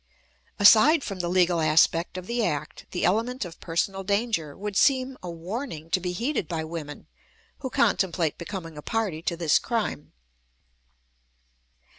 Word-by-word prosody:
Aside 275 +9 +7
from 195 -3 -5
the 175 -1 -2
legal 175 -1 +3
aspect 165 +3 +3
of 185 - -6
the 235 +2 -1
act, 150 -8 -3
the 180 - -1
element 230 +5 0
of 170 -2 -10
personal 190 +3 -2
danger 200 -7 -1
would 205 0 -5
seem 265 +3 +3
a 180 - -6
warning 170 - -6
to 190 - +3
be 180 0 -3
heeded 230 - -2
by 165 -3 -3
women 155 -2 -7 0.5
who 265 -3 -4
contemplate 170 -8 +1
becoming 165 -3 -7
a - - -8
party 205 -5 -2
to 170 0 -2
this 165 -3 +3
crime. 225 - -3
180 Hz, 150 wpm, -26 LUFS, 165-225 Hz, 0.5 s, Aside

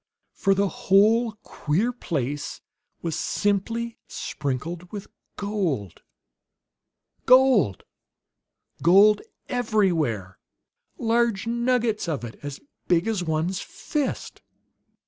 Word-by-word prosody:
For 195 -1 +2
the 200 +1 +2
whole 215 +5 +3
queer 195 +12 -1
place 145 - -3 0.4
was 165 -3 -2
simply 230 +3 -1
sprinkled 160 +6 -4
with 205 -2 -6 0.3
gold. 180 - -2 1.3
Gold 255 - +5 1.0
gold 200 +5 +6 0.3
everywhere; 175 - 0 0.6
large 230 -3 +1
nuggets 235 -3 0
of 150 -6 -2
it, 115 -2 -8
as 145 -1 -6 0.3
big 175 +2 +2
as 215 -5 0
one's 160 +3 -1
fist! 295 -3 -4
195 Hz, 90 wpm, -25 LUFS, 155-230 Hz, 1.3 s, gold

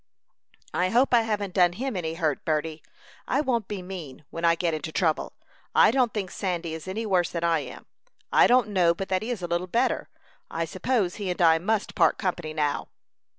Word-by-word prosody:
"I 180 +1 +1
hope 250 +5 +3
I 235 - +6
haven't 210 -4 -2
done 175 -1 +4
him 255 +4 -3
any 165 -3 -3
hurt, 155 -5 -1
Berty. 155 0 -1 0.5
I 270 - +1
won't 240 -8 0
be 200 -3 -5
mean, 170 -7 -8
when 165 - -6
I 170 0 +5
get 170 -1 -1
into 155 0 -4
trouble. 160 -2 0 0.4
I - - +7
don't 250 -2 +2
think 195 -4 -4
Sandy 175 -4 -3
is 160 +2 -7
any 215 +4 -3
worse 185 -4 +2
than 170 -1 -4
I 165 -1 +3
am. 130 -4 -9 0.5
I - - +7
don't 245 -3 +4
know 175 -4 +3
but 195 +2 -5
that 185 -1 +1
he 220 - -5
is 230 -7 -3
a - - -1
little 175 +2 -1
better. 230 +6 0 0.4
I 165 0 -2
suppose 185 +2 -1
he 200 -3 -3
and 180 - -3
I 165 -2 +5
must 210 +4 -1
part - - +3
company 175 -5 -2
now." 150 -2 -1
180 Hz, 210 wpm, -26 LUFS, 165-210 Hz, 0.5 s, I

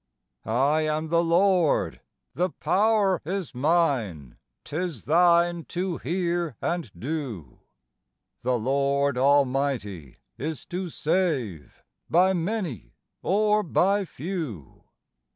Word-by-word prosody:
"I 135 +7 +2
am 155 +1 -1
the 170 +1 +3
Lord; 175 -1 +2 0.3
the 180 +2 0
power 200 0 +2
is 185 -1 -4
mine; 125 - 0 0.3
'tis 160 - -4
thine 170 +1 +4
to 180 -1 -3
hear 175 -4 -1
and 170 -7 -2
do; 120 - -5 0.8
The 125 0 +1
Lord 140 +3 +1
almighty 130 - +1 0.2
is 150 -1 -4
to 180 0 -2
save, 150 - -2 0.3
by 185 +3 +4
many 165 - -3 0.3
or 210 +2 +2
by 200 +2 +2
few." 150 - -6
160 Hz, 100 wpm, -26 LUFS, 130-180 Hz, 0.8 s, thine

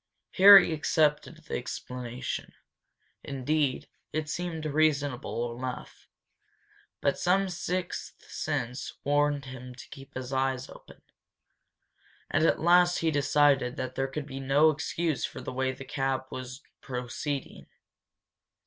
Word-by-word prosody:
Harry 195 -3 +9
accepted 155 +1 +1
the - - -4
explanation. 125 0 -5 0.7
Indeed, 140 0 -1 0.2
it 155 -1 -2
seemed 165 -1 -4
reasonable 140 -6 0
enough. 125 +1 -7 0.9
But 140 - +1
some 190 +2 +2
sixth 180 0 -4
sense 125 +3 -3
warned 145 0 +1
him 125 -1 -9
to - - -11
keep 135 -2 -12
his 130 +1 -5
eyes 130 -1 0
open. - - -15 1.3
And 155 - +2
at - - +2
last 175 +1 +5
he 160 - +3
decided 140 -3 +3
that 130 -1 -4
there 135 +1 -1
could 140 +2 -5
be 135 -2 -7
no 140 +4 +4
excuse 160 0 -2
for - - -4
the - - -6
way 130 +1 0
the 130 +1 -9
cab 135 -1 -1
was 130 +2 -7 0.2
proceeding. 130 +3 -5
140 Hz, 120 wpm, -28 LUFS, 130-155 Hz, 1.3 s, Harry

